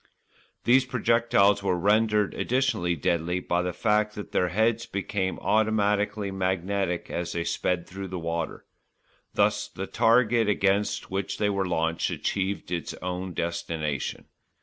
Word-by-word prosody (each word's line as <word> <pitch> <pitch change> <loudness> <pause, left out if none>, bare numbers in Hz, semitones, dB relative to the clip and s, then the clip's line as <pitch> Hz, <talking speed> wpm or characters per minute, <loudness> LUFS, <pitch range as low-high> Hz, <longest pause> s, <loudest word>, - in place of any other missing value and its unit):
These 130 +2 +5
projectiles 115 -5 +3
were 95 -2 +1
rendered 105 +2 +2
additionally 120 -9 0
deadly 85 +2 0
by 85 -1 0
the 90 0 -2
fact 105 +3 +1
that 105 - -7
their 90 - +2
heads 110 +4 +1
became 100 -2 -2
automatically 105 -1 +1
magnetic 95 -1 -1
as 85 0 -3
they 85 - -1
sped 85 0 -1
through 95 +1 -6
the 95 0 -5
water. 85 -1 -3 0.7
Thus - - +2
the - - -6
target 115 -1 +3
against 100 0 +1
which 100 +1 -2
they 105 -1 +1
were 100 -1 -1
launched 80 -1 0
achieved 95 -2 -2
its 85 -2 -3
own 90 0 -5
destination. 80 -4 -3
100 Hz, 135 wpm, -26 LUFS, 90-105 Hz, 0.7 s, These